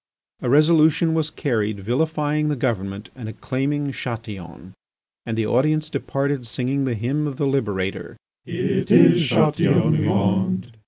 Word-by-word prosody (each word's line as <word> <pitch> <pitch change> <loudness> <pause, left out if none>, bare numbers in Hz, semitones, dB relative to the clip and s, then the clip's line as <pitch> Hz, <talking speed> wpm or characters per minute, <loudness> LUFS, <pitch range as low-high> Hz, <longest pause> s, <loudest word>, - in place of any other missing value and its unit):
A - - -2
resolution 160 +3 +4
was 160 -1 0
carried 110 -9 -2
vilifying 150 +5 -1
the 150 - 0
government 105 -5 -3
and 120 -4 -7
acclaiming 140 +5 -2
Chatillon. 100 -8 -8 0.5
And 110 -1 -3
the 110 - 0
audience 155 +7 +1
departed 140 -2 -2
singing 130 +4 -2
the 125 -3 -1
hymn 135 +8 -1
of 135 -3 -6
the 145 - 0
liberator: 105 -9 -2 0.3
"It - - -2
is - - +6
Chatillon - - +3
we - - 0
want." 95 +1 0
130 Hz, 140 wpm, -22 LUFS, 110-150 Hz, 0.5 s, is